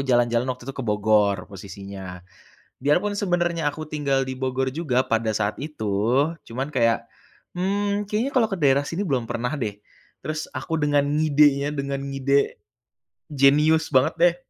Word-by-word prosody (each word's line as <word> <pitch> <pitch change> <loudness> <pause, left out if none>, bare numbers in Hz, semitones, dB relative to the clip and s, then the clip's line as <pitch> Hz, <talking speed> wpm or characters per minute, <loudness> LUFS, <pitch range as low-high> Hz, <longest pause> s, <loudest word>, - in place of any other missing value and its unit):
jalan-jalan 120 -2 +2
waktu 125 -1 -4
itu 135 - -5
ke 135 - -6
Bogor 105 -3 +2
posisinya, 95 -2 -9 0.6
biar 145 +3 +3
pun 205 +3 -1
sebenarnya 175 -5 0
aku 150 +2 -5
tinggal 140 -3 0
di 130 - -5
Bogor 130 0 -2
juga 135 -5 0
pada 115 0 0
saat 105 +3 -1
itu, 125 +1 0 0.2
cuman 130 +5 -4
kayak, 115 -3 +2 0.5
"Mmm, 200 +2 -1
kayaknya 230 +7 -1
kalau 245 -5 +3
ke 195 - -3
daerah 140 -3 +2
sini 185 +5 -2
belum 130 - -1
pernah 120 +2 -2
deh." 110 -9 -3 0.5
Terus 155 0 -3
aku 160 +4 -2
dengan 145 -1 +2
ngidenya, 145 -1 +3
dengan 140 0 -3
ngide 140 +1 +1 0.7
jenius 150 +3 +4
banget 130 0 +4
deh. 175 0 +4
140 Hz, 155 wpm, -24 LUFS, 120-155 Hz, 0.7 s, jenius